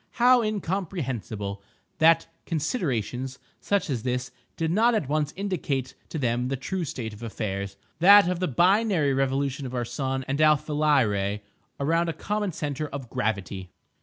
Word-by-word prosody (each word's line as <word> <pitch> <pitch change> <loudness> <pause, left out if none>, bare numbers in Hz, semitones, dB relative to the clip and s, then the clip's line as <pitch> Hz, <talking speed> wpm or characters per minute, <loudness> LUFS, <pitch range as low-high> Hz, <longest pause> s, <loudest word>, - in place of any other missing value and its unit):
How 245 +1 +5
incomprehensible, 155 - -3 0.4
that 165 +1 +5 0.2
considerations 135 - -2 0.2
such 200 -3 0
as 130 -7 -2
this 125 +1 -2 0.3
did 165 -1 0
not 230 +5 +4
at 185 -11 0
once 150 0 0
indicate 150 -10 -2 0.2
to - - -4
them 125 -2 0
the 135 - -1
true 180 +7 -3
state 115 -6 -5
of 105 - -12
affairs—that 110 - +3
of 180 -1 -1
the 185 - 0
binary 180 - +3
revolution 135 0 0
of 125 - -6
our 120 -1 -1
sun 135 +1 -3
and 140 +3 0
Alpha 155 0 +3
Lyrae 105 -10 +2 0.4
around 165 +4 +1
a - - -1
common 205 +4 -2
centre 150 -1 -3
of 135 -4 -7
gravity! 100 -3 -2
140 Hz, 150 wpm, -26 LUFS, 125-170 Hz, 0.4 s, How